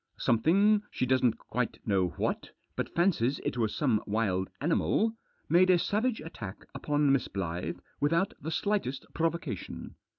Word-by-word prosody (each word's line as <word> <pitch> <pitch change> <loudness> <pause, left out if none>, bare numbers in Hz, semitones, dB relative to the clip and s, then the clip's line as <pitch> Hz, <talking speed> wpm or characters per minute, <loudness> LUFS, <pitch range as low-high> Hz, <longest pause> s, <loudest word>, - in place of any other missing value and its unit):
Something, 195 - +4
she - - -1
doesn't 130 -2 +2
quite 125 +1 -3
know 95 -4 +2
what, - - -1 0.3
but - - -2
fancies 155 -8 +2
it - - -1
was 110 -3 0
some 125 -8 +2
wild 100 -3 0
animal, 185 - +1 0.3
made 180 +4 +5
a 180 - +6
savage 215 +5 0
attack 115 - -8
upon 145 -1 +1
Miss 135 -3 +2
Blyth 85 -2 -3 0.2
without 165 +6 +2
the 160 - -4
slightest 165 -6 -1
provoca 165 0 -1
tion. - - -9
145 Hz, 145 wpm, -30 LUFS, 110-175 Hz, 0.3 s, a